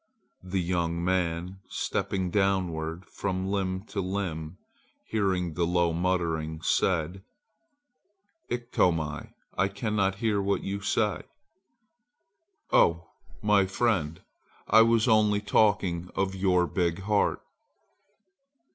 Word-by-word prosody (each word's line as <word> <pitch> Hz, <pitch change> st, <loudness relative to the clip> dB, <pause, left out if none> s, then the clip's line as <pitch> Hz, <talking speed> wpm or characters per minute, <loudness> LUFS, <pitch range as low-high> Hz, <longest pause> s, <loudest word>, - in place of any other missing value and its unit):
The 95 Hz, +1 st, -2 dB
young 85 Hz, -1 st, -1 dB
man, 90 Hz, 0 st, -1 dB
stepping 95 Hz, -2 st, -2 dB
downward 90 Hz, -4 st, 0 dB
from 95 Hz, -1 st, -3 dB
limb 95 Hz, -1 st, -1 dB
to 100 Hz, -, -2 dB
limb, 90 Hz, -4 st, -4 dB, 0.5 s
hearing 95 Hz, -5 st, 0 dB
the 85 Hz, +1 st, 0 dB
low 85 Hz, -1 st, +2 dB
muttering, 85 Hz, -3 st, -1 dB
said: 90 Hz, +1 st, 0 dB, 1.3 s
"Iktomi, 85 Hz, -, -1 dB, 0.2 s
I 95 Hz, -, +2 dB
cannot 100 Hz, -1 st, -1 dB
hear 105 Hz, -1 st, 0 dB
what 100 Hz, 0 st, 0 dB
you 100 Hz, +1 st, -3 dB
say!" 105 Hz, -1 st, 0 dB, 1.5 s
"Oh, 85 Hz, 0 st, +3 dB, 0.3 s
my 105 Hz, -2 st, +4 dB
friend, 95 Hz, -7 st, 0 dB, 0.4 s
I 110 Hz, -, +7 dB
was 115 Hz, +1 st, +4 dB
only 105 Hz, -3 st, +4 dB
talking 100 Hz, -4 st, +1 dB
of 95 Hz, 0 st, 0 dB
your 95 Hz, -2 st, +2 dB
big 85 Hz, 0 st, -1 dB
heart." 105 Hz, +1 st, +1 dB
95 Hz, 100 wpm, -28 LUFS, 85-100 Hz, 1.5 s, I